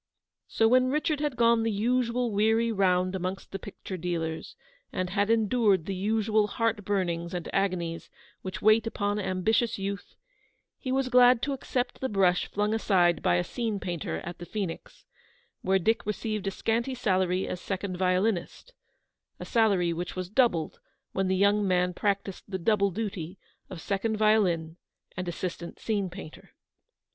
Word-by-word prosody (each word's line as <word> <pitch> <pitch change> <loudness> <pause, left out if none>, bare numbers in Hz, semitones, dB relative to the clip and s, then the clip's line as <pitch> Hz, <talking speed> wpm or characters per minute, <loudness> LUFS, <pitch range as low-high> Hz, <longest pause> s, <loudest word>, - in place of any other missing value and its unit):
So, 225 - +2
when 255 +2 +4
Richard 300 +1 0
had 295 -3 -1
gone 235 -1 +4
the 225 - 0
usual 240 +2 0
weary 220 +3 +2
round 185 -3 +2
amongst 185 +1 -4
the 195 - -4
picture 190 -1 -8
dealers, 165 -2 -3 0.4
and 185 -1 -2
had 200 +1 +1
endured 220 -5 +3
the 195 - -3
usual 215 +2 +1
heart 225 0 -1
burnings 175 -3 -1
and 175 - -4
agonies 175 -4 -1 0.3
which 185 - -6
wait 215 +2 +5
upon 205 -1 -1
ambitious 205 +4 +1
youth, 200 0 -5 0.6
he 260 - -4
was 265 0 +1
glad 245 -1 +6
to 280 - 0
accept 250 -1 -3
the 260 - -1
brush 185 -3 +2
flung 210 +1 -1
aside 180 -6 +2
by 90 - +3
a 90 - +2
scene 225 - -3
painter 175 -4 -4
at 175 0 -8
the 175 - -7
Phoenix, 195 -6 -5 0.6
where 190 +1 +2
Dick 220 +5 +1
received 210 -1 -2
a - - 0
scanty 235 +6 -1
salary 185 -5 +1
as 180 - -5
second 190 -1 -3
violinist; 185 - -1 0.7
a - - -6
salary 200 -7 +2
which 175 +2 -5
was 185 0 -5
doubled 210 -10 +1 0.3
when 190 0 0
the 190 - +1
young 200 +1 +3
man 180 -1 +2
practised 200 0 -2
the 190 - -3
double 200 +2 +2
duty 190 -3 -5 0.3
of 180 - -7
second 205 +5 -1
violin 180 -7 +2 0.4
and 185 -1 -4
assistant 175 0 -5
scene 205 -4 -1
painter. 175 -3 -11
200 Hz, 160 wpm, -28 LUFS, 180-225 Hz, 0.7 s, glad